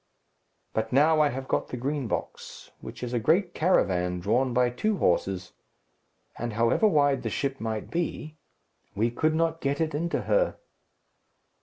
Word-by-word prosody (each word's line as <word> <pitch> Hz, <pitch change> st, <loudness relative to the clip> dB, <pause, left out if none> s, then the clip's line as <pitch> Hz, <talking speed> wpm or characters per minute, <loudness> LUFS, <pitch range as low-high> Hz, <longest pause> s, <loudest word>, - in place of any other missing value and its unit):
"But 110 Hz, 0 st, -2 dB
now 155 Hz, +4 st, +4 dB
I 150 Hz, -, +4 dB
have 130 Hz, +1 st, -5 dB
got -, -, 0 dB
the 125 Hz, -, -6 dB
Green 135 Hz, +1 st, -2 dB
Box, -, -, -6 dB
which -, -, -9 dB
is 125 Hz, 0 st, -4 dB
a 120 Hz, -, +1 dB
great 175 Hz, -, +2 dB
caravan 90 Hz, -, +1 dB
drawn 125 Hz, +8 st, +1 dB
by 125 Hz, 0 st, +2 dB
two 210 Hz, -, -1 dB
horses, 90 Hz, -, 0 dB, 0.9 s
and 120 Hz, -1 st, -3 dB
however 115 Hz, -, +3 dB
wide 145 Hz, -7 st, +3 dB
the 115 Hz, -, -3 dB
ship 135 Hz, +4 st, -2 dB
might 110 Hz, -1 st, -4 dB
be, 160 Hz, -2 st, -3 dB, 0.6 s
we 115 Hz, +3 st, +1 dB
could 155 Hz, +6 st, +1 dB
not 165 Hz, 0 st, 0 dB
get 140 Hz, +1 st, -1 dB
it 160 Hz, -1 st, 0 dB
into 170 Hz, +4 st, -1 dB
her." -, -, +1 dB
135 Hz, 160 wpm, -27 LUFS, 115-160 Hz, 0.9 s, now